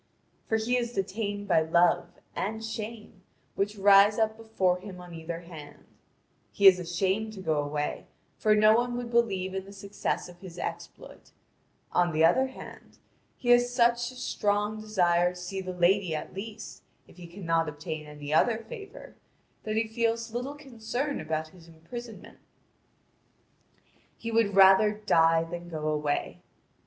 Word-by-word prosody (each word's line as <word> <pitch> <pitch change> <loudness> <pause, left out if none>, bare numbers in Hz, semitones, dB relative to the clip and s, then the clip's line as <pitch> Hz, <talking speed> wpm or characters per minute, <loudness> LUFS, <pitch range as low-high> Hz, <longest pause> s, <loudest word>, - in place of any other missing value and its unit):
For 220 - +2
he 235 +3 0
is 240 -1 -2
detained 205 +1 -3
by 160 - +4
Love 170 +2 +3 0.3
and 220 +2 -3
Shame 220 -3 -7 0.3
which 205 +2 -1
rise 200 +1 +6
up 220 -1 +1
before 195 -5 0
him 185 -1 -10
on 180 -1 -11
either 165 +1 -6
hand: 160 -4 -12 0.7
he 200 - -1
is 185 -2 +9
ashamed 190 +5 -1
to 200 - -10
go 160 -5 0
away, 145 0 -3 0.3
for 215 -1 +4
no 215 +1 +6
one 240 +1 0
would 240 -1 -5
believe 195 -6 +1
in 190 0 -3
the 200 - -12
success 200 -1 -4
of 175 -1 -14
his 180 -2 -11
exploit; - - -8 0.6
on 175 -2 +2
the 160 +1 +4
other 260 +11 +3
hand, 260 - -12 0.4
he 245 - -4
has 245 0 +5
such 240 0 +2
a 255 - -12
strong 210 -3 -1
desire 180 -4 +2
to - - -10
see 190 +2 -5
the 185 -1 -5
lady 180 -1 +2
at 155 - -6
least, 210 +3 -8 0.3
if - - -19
he 175 -1 -10
cannot 165 -3 -1
obtain 150 +1 -6
any 150 0 -6
other 220 +8 +3
favour, 405 - -10 0.5
that 215 0 -2
he 225 0 +1
feels 230 0 -1
little 255 +4 -4
concern 265 0 -4
about 155 0 -3
his 170 -1 -17
imprisonment. 220 +9 -10 1.8
He 230 - -5
would 225 -3 +2
rather 195 +2 +7
die 165 -6 +3
than 175 +1 -7
go 155 -2 -4
away. 150 -1 -2
195 Hz, 160 wpm, -28 LUFS, 175-225 Hz, 1.8 s, is